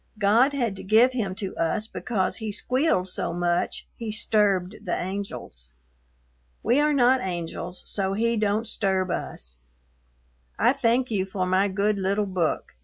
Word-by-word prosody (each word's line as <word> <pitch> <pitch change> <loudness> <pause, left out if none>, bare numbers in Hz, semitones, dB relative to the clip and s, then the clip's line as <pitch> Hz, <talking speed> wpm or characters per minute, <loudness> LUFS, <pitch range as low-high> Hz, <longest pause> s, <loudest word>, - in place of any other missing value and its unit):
God 225 +7 +4
had 240 -8 -1
to - - -8
give 220 +6 +5
him 210 -7 -2
to 195 -1 -5
us 165 +6 0
because 215 -3 -2
he 220 -2 -4
squealed 250 - +1
so 180 - -2
much 175 0 -1
he 225 -2 -4
sturbed 205 -3 +1
the 180 - -2
angels. 185 - -6 0.9
We 240 +5 +3
are 300 +1 +3
not 260 -2 +4
angels 175 0 -5
so 195 -1 -2
he 230 +3 +1
Dont 215 +1 0
sturb 190 -4 0
us. - - -5 1.0
I 240 +3 +4
thank 255 -1 +1
you 195 -3 0
for 190 -1 -2
my 185 +2 +2
good 200 +1 0
little 200 +2 +1
book. 185 -4 -2
200 Hz, 155 wpm, -25 LUFS, 185-230 Hz, 1.0 s, give